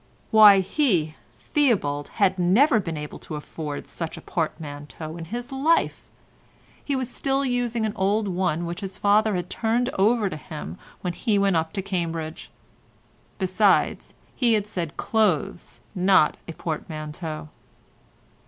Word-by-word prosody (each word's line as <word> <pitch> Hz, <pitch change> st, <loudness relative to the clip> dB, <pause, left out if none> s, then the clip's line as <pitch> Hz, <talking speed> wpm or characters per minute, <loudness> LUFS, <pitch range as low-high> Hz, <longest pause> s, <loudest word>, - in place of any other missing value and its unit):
Why 210 Hz, -3 st, +8 dB
he, 185 Hz, -, +1 dB, 0.2 s
Theobald, 185 Hz, -, 0 dB
had 190 Hz, -3 st, +2 dB
never 225 Hz, -, +4 dB
been 165 Hz, -5 st, -4 dB
able 150 Hz, 0 st, -7 dB
to 155 Hz, -, -7 dB
afford 150 Hz, 0 st, -6 dB
such 165 Hz, -2 st, -5 dB
a -, -, -9 dB
portmanteau 155 Hz, -1 st, -5 dB
in 170 Hz, -1 st, -7 dB
his 240 Hz, -, -6 dB
life. 290 Hz, +5 st, +1 dB, 0.7 s
He 280 Hz, -, -1 dB
was 260 Hz, -2 st, -1 dB
still 270 Hz, +2 st, -1 dB
using 245 Hz, -3 st, 0 dB
an 215 Hz, -, -2 dB
old 205 Hz, +3 st, +1 dB
one 180 Hz, -3 st, 0 dB
which 170 Hz, +1 st, -5 dB
his 190 Hz, -1 st, -5 dB
father 210 Hz, +1 st, +3 dB
had 180 Hz, -1 st, -2 dB
turned 235 Hz, +5 st, 0 dB
over 215 Hz, +1 st, +3 dB
to 185 Hz, -, -4 dB
him 150 Hz, -, -8 dB, 0.2 s
when 180 Hz, -2 st, -2 dB
he 215 Hz, +2 st, 0 dB
went 200 Hz, -2 st, +2 dB
up 160 Hz, 0 st, 0 dB
to 195 Hz, -2 st, -3 dB
Cambridge. 165 Hz, -4 st, -4 dB, 0.9 s
Besides, 190 Hz, 0 st, +2 dB, 0.2 s
he 240 Hz, -3 st, +3 dB
had 210 Hz, -2 st, +1 dB
said 170 Hz, -6 st, -5 dB
clothes, 205 Hz, -7 st, 0 dB
not 185 Hz, -4 st, +4 dB
a 165 Hz, -, -6 dB
portmanteau. 155 Hz, -1 st, -5 dB
190 Hz, 145 wpm, -24 LUFS, 160-220 Hz, 0.9 s, Why